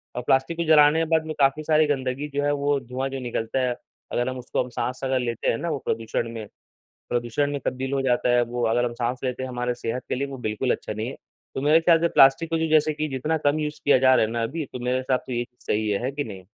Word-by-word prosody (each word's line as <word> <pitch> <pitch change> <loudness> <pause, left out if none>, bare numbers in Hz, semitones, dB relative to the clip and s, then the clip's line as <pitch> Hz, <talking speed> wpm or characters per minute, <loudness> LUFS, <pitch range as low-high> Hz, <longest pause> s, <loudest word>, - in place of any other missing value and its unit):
और 125 - -2
प्लास्टिक 135 +7 +1
को 170 - 0
जलाने 150 0 +6
के 165 - +1
बाद 160 - +1
में 160 - -4
काफ़ी 140 +3 +3
सारी 155 0 +3
गंदगी 135 0 -2
जो 145 - +1
है 145 - +2
वो 145 0 +1
धुआँ 130 +2 -4
जो 135 - -5
निकलता 120 0 -2
है, 125 -1 0 0.4
अगर 120 +1 0
हम 130 - -5
उसको 125 0 -2
हम 125 - -9
साँस 125 +1 -3
अगर 130 -1 +1
लेते 120 -2 -1
हैं 115 - +1
ना 170 - -3
वो 150 - -1
प्रदूषण 115 +1 -2
में 110 -2 -6 0.6
प्रदूषण 120 +4 0
में 140 - -2
तब्दील 130 +2 -2
हो 135 - +1
जाता 125 -1 +1
है 120 - +4
वो 120 0 -3
अगर 120 +2 +2
हम 120 - -3
साँस 120 +1 -2
लेते 130 0 -2
हैं 130 - -4
हमारे 125 0 -2
सेहत 120 +1 -4
के - - 0
लिए 140 +2 -2
वो 135 -1 -7
बिल्कुल 120 +2 -1
अच्छा - - -3
नहीं 110 +2 -4
है। - - -7 0.4
तो - - -2
मेरे 150 +3 +5
ख़याल 165 0 +5
से 170 - +3
प्लास्टिक 135 +3 +5
को 165 - 0
जो 160 - 0
जैसे 155 0 +3
कि 155 +1 -2
जितना 150 +5 -1
कम 145 +2 +2
यूज़ 150 0 -3
किया 145 - +6
जा 130 0 +5
रहा - - +4
है 110 - -5
ना 115 -1 -1
अभी, 150 +6 -3
तो 125 - -5
मेरे 125 +1 0
हिसाब 130 0 0
से 125 -2 -3
ये 120 - 0
चीज़ 125 +1 -20
सही 110 0 0
है। 100 +2 -1
है 130 - -1
कि 145 +1 -3
नहीं? 95 -5 -9
130 Hz, 285 wpm, -24 LUFS, 120-145 Hz, 0.6 s, जलाने